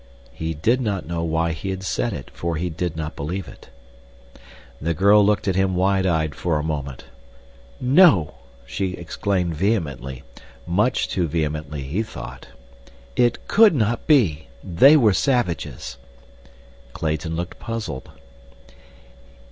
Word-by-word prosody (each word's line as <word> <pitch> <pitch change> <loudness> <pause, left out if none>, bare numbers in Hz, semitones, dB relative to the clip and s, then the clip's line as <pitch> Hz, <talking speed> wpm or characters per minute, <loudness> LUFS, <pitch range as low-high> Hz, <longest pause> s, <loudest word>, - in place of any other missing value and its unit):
He 80 0 -4
did 115 - +1
not 100 -6 -2
know 85 0 -3
why 85 +1 0
he 80 +4 -5
had 95 0 -4
said 120 +5 -1
it, 70 -8 -7
for 85 -1 -3
he 85 +2 -2
did 85 0 -3
not 75 -1 -4
believe 85 +5 -4
it. - - -14 1.1
The 85 +2 -1
girl 100 +4 +5
looked 105 0 +1
at 95 - +1
him 95 -1 +1
wide 95 +1 +2
eyed 80 -3 0
for 85 -3 -1
a 75 - -2
moment. 70 -5 -4 0.8
"No!" 125 - +5 0.3
she 75 +10 -3
exclaimed 90 0 -2
vehemently, 75 - -2 0.4
much 105 +8 +1
too 90 -3 -1
vehemently 75 -2 -3
he 80 +11 -2
thought. 110 - -8 0.7
"It 120 -1 +1
could 215 -5 +6
not 115 -2 0
be. 100 - +3 0.2
They 135 - +6
were 110 -8 +4
savages." 85 - -1 1.0
Clayton 80 +1 -2
looked 85 +2 -5
puzzled. 105 - -5
85 Hz, 135 wpm, -22 LUFS, 80-105 Hz, 1.1 s, could